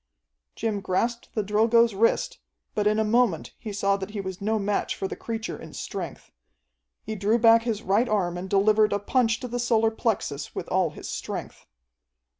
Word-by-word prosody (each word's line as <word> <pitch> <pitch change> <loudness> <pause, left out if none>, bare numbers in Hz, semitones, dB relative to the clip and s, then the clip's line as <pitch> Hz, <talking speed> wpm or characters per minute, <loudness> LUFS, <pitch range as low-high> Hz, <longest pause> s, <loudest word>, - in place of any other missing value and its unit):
Jim 215 -2 -1
grasped 230 +6 -1
the 215 - +1
Drilgo's 225 +3 +3
wrist, 225 +4 +1 0.3
but 210 -1 +1
in 215 0 +2
a 220 - +3
moment 215 -6 +1
he 220 - -6
saw 200 0 +1
that 190 0 -6
he 210 -1 -5
was 190 -1 -5
no 220 +2 +1
match 205 0 -1
for 195 - -3
the - - -6
creature 225 -1 -5
in - - -10
strength. - - -6 0.7
He 220 - -4
drew 210 +2 +2
back 230 0 +6
his 225 -2 -2
right 215 +6 +2
arm 180 -5 0
and 180 +2 -5
delivered 210 +2 +4
a - - +2
punch 225 +1 +1
to 250 - -4
the 245 0 -3
solar 225 -2 +2
plexus 195 -11 -2
with - - -4
all - - +2
his - - -9
strength. - - -6
215 Hz, 190 wpm, -26 LUFS, 200-230 Hz, 0.7 s, back